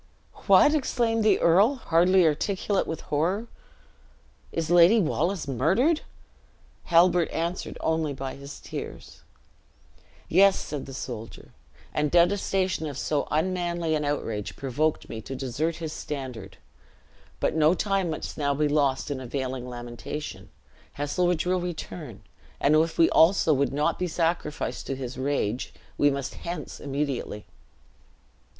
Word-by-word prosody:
"What!" 295 - +7
exclaimed 235 -6 +1
the 210 -2 +4
earl, 195 +11 +4
hardly 180 -4 +3
articulate 190 +5 0
with 160 - -4
horror; 175 +9 -1 1.1
"is 165 0 -2
Lady 175 +6 +7
Wallace 170 -1 0
murdered?" 190 - +2 0.8
Halbert 175 0 +4
answered 170 +2 -3
only 160 -2 0
by 135 -1 -5
his 140 +1 -10
tears. - - -8 1.1
"Yes," 195 +3 +5
said 145 -2 -5
the 135 - -8
soldier; 115 -4 -7 0.4
"and 150 0 +1
detestation 185 -1 +2
of 140 -3 -6
so 145 0 -1
unmanly 170 0 0
an 150 -1 0
outrage 115 -8 -3
provoked 145 +4 -1
me 110 - -6
to 135 - -7
desert 135 +6 -2
his 160 -2 -5
standard. 130 -12 -6 0.8
But - - +1
no 160 +2 +4
time 195 -2 0
must 155 - -5
now 140 -1 +1
be 150 +1 +2
lost 145 -1 +1
in 140 - -3
unavailing 130 0 -4
lamentation. 120 +5 -7 0.4
Heselrigge 170 +4 0
will 180 0 +1
return; 170 - -6 0.4
and 145 +2 +4
if 160 +1 +2
we 165 - +6
also 165 -1 +5
would 140 0 +1
not 145 +2 0
be 180 - 0
sacrificed 165 -2 -2
to 135 - -2
his 130 -1 -6
rage, 130 -4 -1 0.2
we 145 - +4
must 140 -1 -3
hence 175 +1 -6
immediately." 140 -6 -3
155 Hz, 130 wpm, -26 LUFS, 140-180 Hz, 1.1 s, What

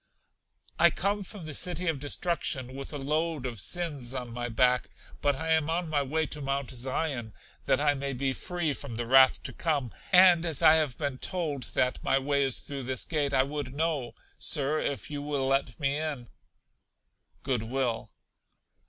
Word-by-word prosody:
I - - +7
come 205 +1 -1
from 195 -2 -7
The 155 - -6
City 180 +3 0
of 160 -5 0
Destruction 145 -3 -1
with 135 +1 -7
a 150 - -5
load 155 +1 -1
of 120 -4 -4
Sins 145 - -2
on 125 -2 -4
my 120 0 -3
back; 125 +2 +2 0.3
but 145 -1 +2
I 160 +4 -4
am 160 -1 +3
on 170 0 -1
my 145 -2 +2
way 155 +4 0
to 150 +1 -5
Mount 140 -1 -2
Zion, 130 -2 -3 0.3
that 130 - +3
I 145 0 +3
may 140 0 -3
be 135 +1 -1
free 175 -1 -2
from 135 -4 -8
the 120 +1 -3
wrath 130 +2 +5
to - - -5
come; 145 -8 -1 0.2
and 180 -2 +7
as 165 -4 -1
I 155 - +8
have 155 -5 +1
been 140 -4 -3
told 155 -9 -3
that 125 0 0
my 135 - +2
way 140 +1 +1
is 135 -2 +1
through 140 -1 -6
this 130 -1 -1
gate, 150 -4 -1
I 130 -1 +4
would 140 -1 -5
know, 150 -5 -1 0.2
Sir, 150 0 +3
if 130 -3 -3
you 145 -1 -4
will 145 -2 -2
let 135 -4 0
me 140 0 0
in? 150 -6 -4 1.1
Good 130 -4 0
will. 120 0 -2
140 Hz, 190 wpm, -28 LUFS, 130-155 Hz, 1.1 s, I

